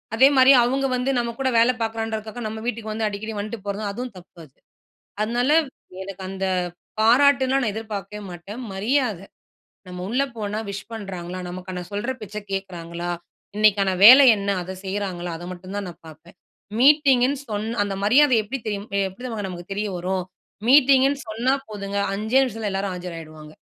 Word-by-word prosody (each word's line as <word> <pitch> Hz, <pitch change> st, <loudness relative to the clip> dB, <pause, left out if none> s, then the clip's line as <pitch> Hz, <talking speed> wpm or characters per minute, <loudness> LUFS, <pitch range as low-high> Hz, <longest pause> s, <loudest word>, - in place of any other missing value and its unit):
அதே 265 Hz, +4 st, +7 dB
மாதிரி 260 Hz, +1 st, +8 dB
அவங்க 270 Hz, +3 st, 0 dB
வந்து 250 Hz, +2 st, -1 dB
நம்ப 235 Hz, -1 st, -1 dB
கூட 265 Hz, -, +1 dB
வேல 235 Hz, +2 st, +5 dB
பார்க்குறன்றதுக்காக 225 Hz, 0 st, -3 dB
நம்ப 220 Hz, +1 st, -6 dB
வீட்டுக்கு 225 Hz, -2 st, -3 dB
வந்து 220 Hz, 0 st, -1 dB
அடிக்கடி 210 Hz, +2 st, -5 dB
வந்துட்டு 215 Hz, +3 st, -4 dB
போறதும் 200 Hz, +1 st, -3 dB
அதுவும் 245 Hz, +3 st, -6 dB
தப்பு 180 Hz, -1 st, -16 dB
அது. 135 Hz, -, -25 dB, 0.7 s
அதனால 240 Hz, +5 st, 0 dB, 0.5 s
எனக்கு 195 Hz, 0 st, -8 dB
அந்த 190 Hz, 0 st, -3 dB, 0.5 s
பாராட்டுலாம் 265 Hz, +3 st, +4 dB
நான் 215 Hz, -, -1 dB
எதிர்பார்க்கவே 210 Hz, -2 st, -6 dB
மாட்டேன். 180 Hz, +6 st, -9 dB
மரியாத, 220 Hz, +1 st, 0 dB, 0.7 s
"நம்ம 180 Hz, 0 st, -7 dB
உள்ளே 260 Hz, +4 st, +1 dB
போனா 210 Hz, 0 st, -3 dB
விஷ் 200 Hz, +2 st, -7 dB
பண்றாங்களா. 185 Hz, -5 st, -6 dB
நமக்கான 180 Hz, 0 st, -6 dB
சொல்ற 205 Hz, +5 st, -2 dB
பேச்ச 210 Hz, 0 st, -7 dB
கேட்குறாங்களா. 175 Hz, -3 st, -4 dB, 0.5 s
இன்னைக்கான 205 Hz, -2 st, +4 dB
வேல 260 Hz, +6 st, +11 dB
என்ன 200 Hz, 0 st, -3 dB
அத 185 Hz, +2 st, -6 dB
செய்றாங்களா" 190 Hz, -3 st, -3 dB
அத 175 Hz, -, -9 dB
மட்டும் 185 Hz, +2 st, -8 dB
தான் 200 Hz, -2 st, -4 dB
நான் 170 Hz, -, -14 dB
பார்ப்பேன். 165 Hz, +4 st, -15 dB, 0.4 s
மீட்டிங்குன்னு 275 Hz, -1 st, +4 dB
சொன்ன 220 Hz, +2 st, -3 dB
அந்த 200 Hz, -1 st, -3 dB
மரியாத 260 Hz, +6 st, +5 dB
எப்படி 260 Hz, +6 st, -4 dB
தெரியும் 205 Hz, 0 st, -4 dB, 0.2 s
எப்படி 190 Hz, -, -13 dB
தெரியுமாங்க 225 Hz, -6 st, -4 dB
நமக்கு 175 Hz, +1 st, -9 dB
தெரிய 210 Hz, +1 st, -2 dB
வரும்? 185 Hz, +1 st, -2 dB, 0.5 s
மீட்டிங்குன்னு 275 Hz, 0 st, +5 dB
சொன்னா 235 Hz, +5 st, +1 dB, 0.2 s
போதுங்க, 200 Hz, -1 st, -5 dB, 0.2 s
"5 220 Hz, +6 st, +2 dB
நிமிஷத்தில 225 Hz, -4 st, -3 dB
எல்லாரும் 195 Hz, -1 st, -2 dB
ஆஜராயிடுவாங்க" 155 Hz, -4 st, -9 dB
210 Hz, 155 wpm, -23 LUFS, 190-245 Hz, 0.7 s, வேல